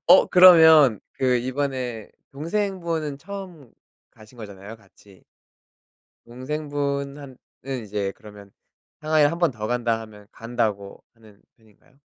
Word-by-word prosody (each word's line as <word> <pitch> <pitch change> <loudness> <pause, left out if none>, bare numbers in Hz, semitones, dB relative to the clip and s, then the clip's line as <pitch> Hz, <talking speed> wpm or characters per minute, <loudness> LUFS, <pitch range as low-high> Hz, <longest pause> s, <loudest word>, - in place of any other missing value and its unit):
어 180 +2 +6
그러면 160 - +7
그 130 -1 0
이번에 130 -3 -4 0.2
동생분은 165 -2 -3
처음 180 - -10 0.4
가신 110 +3 -19
거잖아요 105 +1 -10
같이. 100 -3 -22 1.0
동생분한 140 +1 -5 0.3
은 130 -4 -5
이제 100 -1 -4
그러면 105 -4 -15 0.5
상하이를 155 -1 +2
1 170 - -5
번 170 -5 +2
더 110 -2 -6
간다 120 -2 -1
하면 105 -2 -14
간다고 110 -4 -4
하는 110 -3 -21
편인가요? 110 +4 -28
130 Hz, 250 characters per minute, -23 LUFS, 110-150 Hz, 1.0 s, 그러면